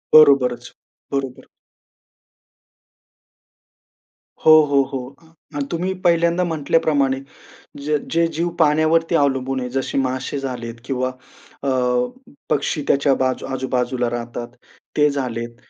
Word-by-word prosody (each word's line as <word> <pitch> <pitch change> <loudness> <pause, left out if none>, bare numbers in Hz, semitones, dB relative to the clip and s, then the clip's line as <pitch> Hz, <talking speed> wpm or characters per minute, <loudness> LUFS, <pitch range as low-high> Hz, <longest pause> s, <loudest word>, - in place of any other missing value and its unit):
बरोबरच. 130 -5 +5 0.4
बरोबर. 135 -2 -3 3.0
हो, 160 - +8
हो, 140 -1 +3
हो. 135 0 -5 0.2
अ, 160 0 -22 0.2
अन् 140 - -1
तुम्ही 180 +3 -1
पहिल्यांदा 170 +1 +3
म्हंटल्याप्रमाणे, 145 -4 +1 0.7
ज 150 0 +1 0.2
जे 170 +1 +3
जीव 175 +1 0
पाण्यावरती 160 +2 +3
अवलंबून 135 -2 +1
आहे 125 -1 -4
जसे 130 +2 -2
मासे 130 +1 -1
झालेत 120 -4 -5
किंवा 130 -1 -1 0.5
अ, - - -2 0.8
पक्षी 145 +1 0
त्याच्या 140 0 +3
बाजू 130 -1 0
आजूबाजूला 125 -1 -1
राहतात, 120 0 -5 0.5
ते 150 0 +5
झालेत 120 -4 -4
135 Hz, 105 wpm, -21 LUFS, 130-155 Hz, 3.0 s, हो